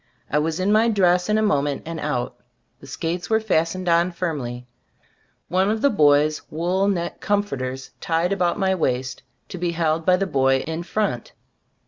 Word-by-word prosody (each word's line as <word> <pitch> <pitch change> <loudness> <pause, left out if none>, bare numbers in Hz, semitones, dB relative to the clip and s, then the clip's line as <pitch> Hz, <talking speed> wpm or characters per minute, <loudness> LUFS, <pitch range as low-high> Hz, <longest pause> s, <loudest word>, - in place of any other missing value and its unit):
I 150 - +3
was 160 +2 -1
in 190 +2 +1
my 220 +2 +4
dress 180 -3 +2
in 210 - +3
a 215 - +2
moment 145 -8 0
and 165 0 -5
out. 145 -5 -2 0.4
The - - -14
skates 175 +2 -4
were 220 0 +3
fastened 185 -3 -1
on 170 +1 +3
firmly, 140 -9 -4 0.8
one 185 +3 +1
of 220 +1 -1
the 280 - +4
boy's 150 -4 +3
wool 180 +5 0
neck 175 -4 -2
"comforters" 135 -11 -2
tied 170 +3 0
about 180 -3 0
my 190 -2 +1
waist, 130 -7 -2 0.3
to 180 - -7
be 175 -1 -1
held 160 -1 0
by 180 +2 +4
the 195 - 0
boy 135 -5 +2
in 160 +1 -4
front. 190 - -2
170 Hz, 175 wpm, -22 LUFS, 150-190 Hz, 0.8 s, my